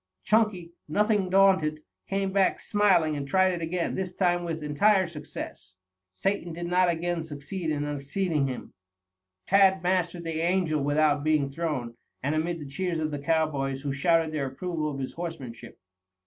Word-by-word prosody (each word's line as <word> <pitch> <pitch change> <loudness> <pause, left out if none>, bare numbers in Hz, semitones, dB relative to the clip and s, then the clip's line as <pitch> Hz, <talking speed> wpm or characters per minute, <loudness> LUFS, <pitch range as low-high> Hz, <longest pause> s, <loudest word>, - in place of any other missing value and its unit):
Chunky, 210 -6 +1
nothing 205 +3 +1
daunted, 185 -6 +3 0.3
came 195 0 0
back 195 -1 +2
smiling 190 -7 +3
and 140 -1 -4
tried 185 +4 +3
it 175 - -4
again, 170 +1 -1
this 190 -1 -3
time 175 -2 +2
with 165 -2 -4
entire 190 +7 +3
success. 150 - -8 0.4
Satan 175 - -2
did 170 +1 -5
not 180 +1 +3
again 170 0 -1
succeed 160 +3 -5
in 145 -1 -1
unseating 145 +2 -1
him. 130 -2 -6 0.7
Tad 190 -1 +4
mastered 180 -1 0
the 165 -1 -3
Angel 170 -4 +1
without 145 0 +2
being 150 -3 +2
thrown, 140 -7 -3 0.3
and 140 +3 0
amid 165 +2 -1
the 150 - -7
cheers 170 +5 -2
of 155 -1 -1
the 145 - -3
cowboys, 140 -3 0
who 140 -1 -2
shouted 165 +2 +2
their 145 -3 -2
approval 155 +3 -3
of 140 - -5
his 130 -1 -4
horsemanship. 130 -9 -7
165 Hz, 160 wpm, -27 LUFS, 145-185 Hz, 0.7 s, Tad